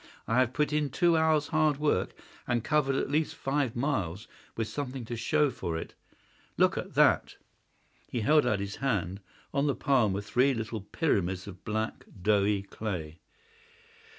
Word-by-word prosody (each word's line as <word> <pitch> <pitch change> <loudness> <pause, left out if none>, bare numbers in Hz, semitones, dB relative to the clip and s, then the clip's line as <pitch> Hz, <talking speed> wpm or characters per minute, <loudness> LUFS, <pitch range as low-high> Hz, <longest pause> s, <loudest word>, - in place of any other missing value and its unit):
I 115 +3 +2
have 130 -1 +2
put 150 +1 0
in 150 -1 +1
two 170 +5 +3
hours' 160 -2 +2
hard 155 -3 +2
work 150 0 0 0.3
and 120 -2 0
covered 145 -2 +2
at 135 - -1
least 155 +1 0
five 135 -3 -1
miles, 115 - -2 0.3
with 115 -1 -1
something 130 -3 -5
to 120 - -4
show 150 +5 +2
for 85 -8 -3
it. - - -7 0.6
Look - - +4
at - - -5
that!" - - +4 0.7
He 120 - -3
held 150 +7 +5
out 110 -4 +1
his 100 0 -4
hand. 100 -8 -1 0.3
On 140 +1 +1
the 140 - +1
palm 130 -8 +2
were 100 - -2
three 125 +6 +2
little 110 -1 -4
pyramids 95 - -1
of 95 -3 -11
black, 110 0 -3 0.2
doughy 100 -1 +2
clay. 90 -6 -5
120 Hz, 165 wpm, -29 LUFS, 100-145 Hz, 0.7 s, held